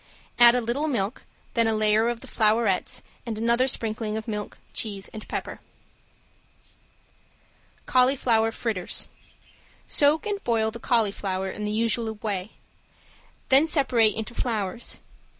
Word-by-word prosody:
Add 240 0 +8
a 250 - +2
little 245 +7 -1
milk, 225 -5 -2 0.3
then 230 -1 +2
a 220 - +2
layer 215 +1 +3
of 240 -1 -4
the - - -11
flowerets 215 -3 +1 0.2
and 230 -3 -5
another 235 +3 +2
sprinkling 220 -3 -2
of 220 - -6
milk, 210 -2 -5 0.2
cheese 200 -3 -3
and 215 - -10
pepper. - - -5 2.3
~CAULIFLOWER 250 -3 +3
FRITTERS~ 215 -6 -2 0.8
Soak 295 +2 +3
and 410 -1 -3
boil 220 -2 +1
the 235 - -8
cauliflower 200 -5 0
in 210 - -5
the 210 - -2
usual 225 0 0
way, 205 -2 -4 1.0
then 275 +4 +6
separate 250 -8 +3
into 225 +2 -4
flowers. 220 -3 -2
225 Hz, 130 wpm, -25 LUFS, 215-240 Hz, 2.3 s, Add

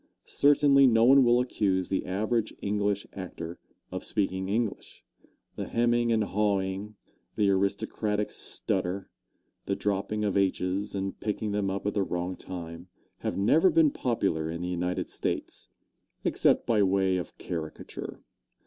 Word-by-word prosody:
Certainly 140 -1 +5
no 115 -1 +5
one 135 +2 +7
will 120 0 +4
accuse 100 -7 0
the 95 - -1
average 110 +4 -1
English 100 0 -1
actor 85 -2 -7 0.3
of - - -4
speaking 95 -2 -1
English. 110 0 -3 0.5
The - - -3
hemming 120 0 +2
and 110 -1 +3
hawing, 100 0 -1 0.4
the 100 -2 +3
aristocratic 105 +2 0
stutter, 95 0 -2 0.6
the 100 - +1
dropping 100 +1 -1
of 100 - 0
h's 95 +1 0
and 95 0 -3
picking 105 0 -2
them 100 -1 0
up 100 +1 -3
at 105 - 0
the 100 - +1
wrong 90 -1 -2
time, 85 -1 -8 0.3
have - - -3
never 155 - +4
been 160 -4 +4
popular 95 -13 -1
in 85 +1 -4
the 90 - -2
United 90 0 -2
States, - - -4 0.5
except - - +3
by 110 -3 +3
way 95 -1 +2
of 90 - -6
caricature. 80 -3 -6
100 Hz, 140 wpm, -28 LUFS, 95-110 Hz, 0.6 s, one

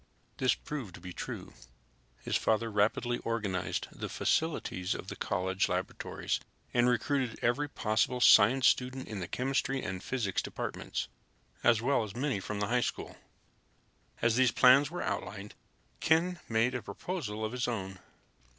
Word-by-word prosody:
This 130 - +3
proved 130 - -6
to - - -11
be 90 0 -8
true. - - -6 0.7
His - - -1
father 115 +1 +1
rapidly 110 +4 +1
organized 105 -6 -2
the - - -6
facilities 105 - 0
of 95 - -7
the - - -5
college 95 0 0
laboratories 90 +1 -2 0.3
and 120 0 +4
recruited 125 0 0
every 145 +5 +1
possible 110 +1 0
science 125 +2 +7
student 130 +1 +1
in 105 -3 -5
the 90 - -4
chemistry 135 +2 -1
and 95 -3 -4
physics 110 -7 -1
departments, - - -4 0.6
as 115 -1 +4
well 135 -2 +2
as 105 -1 -7
many 130 -3 0
from 100 +2 -4
the 105 - +1
high 125 +2 +2
school. - - -3 1.1
As 115 0 +3
these 130 -1 +5
plans 130 +4 +6
were 175 +2 -4
outlined, 105 0 -4 0.5
Ken 170 +2 +2
made 115 +2 +2
a 125 - -2
proposal 110 - -4
of 110 - -3
his 125 0 -1
own. 95 -5 -4
115 Hz, 150 wpm, -31 LUFS, 100-130 Hz, 1.1 s, science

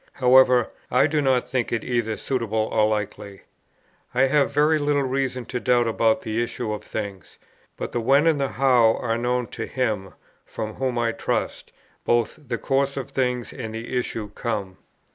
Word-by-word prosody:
However, 125 -1 +5 0.2
I 125 - +4
do 155 0 +1
not 130 -3 +2
think 130 -2 -1
it 115 - -1
either 115 -3 -1
suitable 110 -4 -1
or 110 -1 +3
likely. 100 -2 -4 0.7
I 125 - +3
have 140 +1 +3
very 150 +2 +3
little 145 -1 +1
reason 130 -1 -2
to 125 - -4
doubt 120 -1 +2
about 115 0 +2
the 110 +1 -2
issue 120 -2 -3
of 105 - -6
things, 100 -5 -6 0.4
but - - -5
the 120 - -1
when 135 +6 +4
and 160 -3 +3
the 135 - +1
how 125 -4 +4
are 115 -2 -1
known 125 +1 0
to - - -5
Him, 110 -7 -2 0.3
from 110 0 -6
whom, 130 0 -2
I 115 -1 +1
trust, - - -3 0.3
both 120 +4 +1
the 120 -1 -2
course 140 +2 0
of 135 - -5
things 125 -2 -1
and 110 -3 -6
the 115 +3 -5
issue 115 -4 -2
come. 105 -4 -4
120 Hz, 180 wpm, -24 LUFS, 110-130 Hz, 0.7 s, However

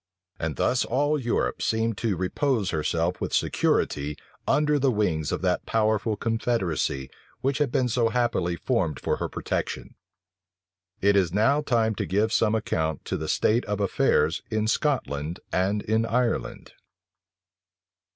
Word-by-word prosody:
And 80 -3 -2
thus 125 - +2
all 145 +4 +1
Europe 120 -3 -1
seemed 110 0 0
to 110 -5 0
repose 100 - 0
herself 85 +3 -1
with - - -1
security 75 +1 0 0.3
under 150 0 +3
the 135 0 +3
wings 90 - 0
of - - -3
that - - 0
powerful 110 0 +1
confederacy 110 - -1 0.3
which 135 +2 0
had 145 -4 +1
been 125 - +2
so 120 -1 +1
happily 120 -8 0
formed 90 - -1
for - - -1
her - - -3
protection. - - -3 1.1
It 100 +1 +4
is 95 -4 +3
now 130 - +3
time 115 -5 +1
to - - -3
give 105 +6 +1
some 110 - +3
account 80 - -2
of - - 0
the 80 - -4
state 115 +9 +2
of 105 -1 -2
affairs 80 -5 +2
in 110 -1 0
Scotland 90 - -1
and 100 +3 0
in 110 +1 +1
Ireland. 120 0 -1
110 Hz, 145 wpm, -26 LUFS, 90-120 Hz, 1.1 s, It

